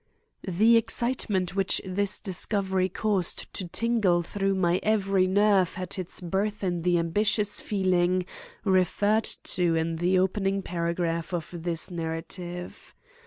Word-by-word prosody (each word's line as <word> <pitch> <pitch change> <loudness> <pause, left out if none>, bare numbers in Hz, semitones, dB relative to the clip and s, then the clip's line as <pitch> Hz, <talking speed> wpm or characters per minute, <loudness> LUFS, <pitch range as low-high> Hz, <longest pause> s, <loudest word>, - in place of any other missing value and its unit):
_ - - -2
The 225 +6 +5
excitement 225 -5 0
which 195 -1 +2
this 190 +1 -1
discovery 190 -1 0
caused 195 -2 -1
to 185 - -5
tingle 205 -4 +1
through 195 +2 -1
my 180 -1 +2
every 195 -3 +2
nerve 200 -2 +3
had 185 +1 -4
its 185 0 -4
birth 200 +4 -2
in 175 -2 -1
the 175 +1 +2
ambitious 205 +5 +1
feeling 185 -2 +1 0.4
referred 205 +3 +2 0.2
to 175 -2 +1
in 165 0 -1
the 180 +3 +2
opening 195 +1 0
paragraph 170 0 -2
of 165 -3 -5
this 170 0 -3
narrative. 175 +2 -6
185 Hz, 130 wpm, -27 LUFS, 175-205 Hz, 0.4 s, The